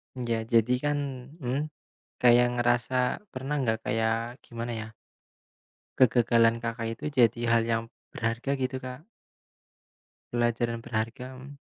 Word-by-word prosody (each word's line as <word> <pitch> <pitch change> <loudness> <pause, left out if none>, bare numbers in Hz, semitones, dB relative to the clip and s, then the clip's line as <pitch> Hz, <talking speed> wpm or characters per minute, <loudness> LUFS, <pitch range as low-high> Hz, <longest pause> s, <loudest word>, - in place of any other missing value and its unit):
Ya 115 -3 -2
jadikan 125 +6 +2 0.4
mhm, 135 +5 -1 0.5
kayak 120 0 +6
ngerasa 120 +1 +1 0.4
pernah 130 +3 -3
nggak 110 -3 +1
kayak 115 +2 -1
gimana 120 0 -5
ya 110 - -6 1.1
kegagalan 115 -2 +4
Kakak 115 0 -2
itu - - -9
jadi 120 0 +5
hal 115 -1 +5
yang 115 -1 +1 0.3
berharga 115 +4 -2
gitu 130 0 -1
Kak. 130 +6 -8 1.3
Pelajaran 120 0 0
berharga, 115 +3 -3
mhm. 140 +2 -11
120 Hz, 115 wpm, -28 LUFS, 115-125 Hz, 1.3 s, kayak